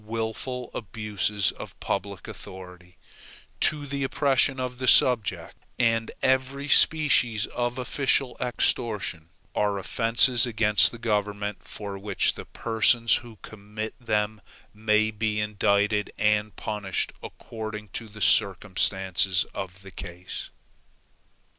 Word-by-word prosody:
Wilful 115 +3 -4
abuses 105 -2 -1
of - - -10
a - - -36
public 100 0 -4
authority, 90 -1 -11 0.6
to 150 -1 +2
the 140 0 -3
oppression 135 0 +2
of 125 -1 -4
the 130 - -3
subject, 125 -4 +3 0.2
and 115 -2 +1
every 130 +2 0
species 130 -9 +4
of 120 0 -3
official 130 0 0
extortion, 105 -9 -1 0.2
are 105 -1 0
offenses 115 +4 +4
against 105 -2 +6
the 120 - -9
government, 105 -2 -2
for 100 -2 -7
which 100 -1 0
the - - -9
persons 115 +1 +2
who 120 -3 -12
commit 110 +1 -7
them 105 -2 -1 0.3
may 110 0 +1
be 105 0 -2
indicted 105 0 +1
and 105 0 +1
punished 105 -3 -2
according 110 -2 -8
to 115 +4 -7
the 110 +1 -12
circumstances 95 -1 +2
of 95 0 -7
the 95 - -11
case. 85 +1 -7
110 Hz, 115 wpm, -26 LUFS, 100-120 Hz, 0.6 s, against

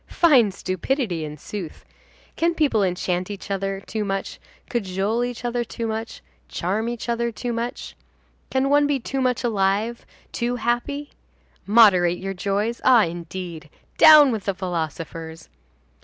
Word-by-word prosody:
Fine 270 -11 +4
stupidity, 185 - -2
in 150 0 -7
sooth! 175 +2 -8 0.5
Can 335 +1 +1
people 285 -9 +2
enchant 180 0 -1
each 200 0 -7
other 195 0 -2
too 215 +2 -4
much, 195 -1 -4 0.3
cajole 205 +1 -1
each 245 0 -5
other 240 0 -1
too 230 0 -5
much, 225 +1 -5 0.3
charm 210 +6 -2
each 240 0 -5
other 235 0 -1
too 240 +2 -4
much? 235 +2 -5 0.5
Can 265 +1 +1
one 290 0 +4
be 285 -2 0
too 265 +2 -3
much 255 -1 0
alive, 215 +1 0 0.3
too 240 +1 -1
happy? 245 +5 -2 0.6
Moderate 190 -5 +5
your 195 +1 -4
joys. 200 +5 -2
Ah, 245 -4 +6
indeed! 170 -1 -7 0.3
Down 305 -3 +9
with 215 -4 -4
the 195 - -1
philosophers! 165 -2 -5
215 Hz, 140 wpm, -23 LUFS, 185-240 Hz, 0.6 s, Down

